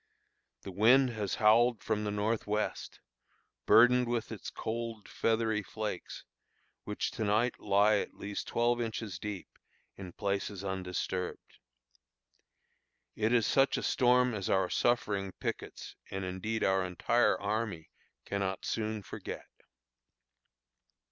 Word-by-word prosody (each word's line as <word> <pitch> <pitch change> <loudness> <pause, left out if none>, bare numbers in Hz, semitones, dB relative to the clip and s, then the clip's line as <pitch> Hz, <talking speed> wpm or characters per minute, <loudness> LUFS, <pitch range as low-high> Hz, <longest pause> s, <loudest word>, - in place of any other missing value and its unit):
The 95 - -7
wind 125 +7 +5
has 105 -4 -2
howled 115 +2 +4
from 105 -1 -1
the - - -1
north 105 +2 -1
west, 105 +1 -2 0.7
burdened 125 +1 +6
with 115 -1 -2
its 110 - -6
cold, 115 -1 -5
feathery 110 -1 0
flakes, 105 -2 -6 0.6
which 105 - -2
to 115 - -3
night 110 +4 +1
lie 105 +1 +4
at - - -4
least 100 0 -5
twelve 120 +1 +1
inches 110 -5 -4
deep 105 -3 -5 0.5
in 95 -2 -8
places 100 -1 -2
undisturbed. 95 -1 -4 1.6
It 110 +1 +1
is 120 -3 +4
such 135 +4 +3
a - - -3
storm 125 -1 +3
as 100 -3 -3
our 95 -2 +2
suffering 100 -5 0
pickets, - - -6
and 95 0 -4
indeed 100 +5 -3
our 95 0 +3
entire 95 +6 +2
army, 105 -5 -3 0.3
cannot 100 -1 -2
soon 110 -2 -2
forget. - - -8
105 Hz, 120 wpm, -31 LUFS, 100-115 Hz, 1.6 s, burdened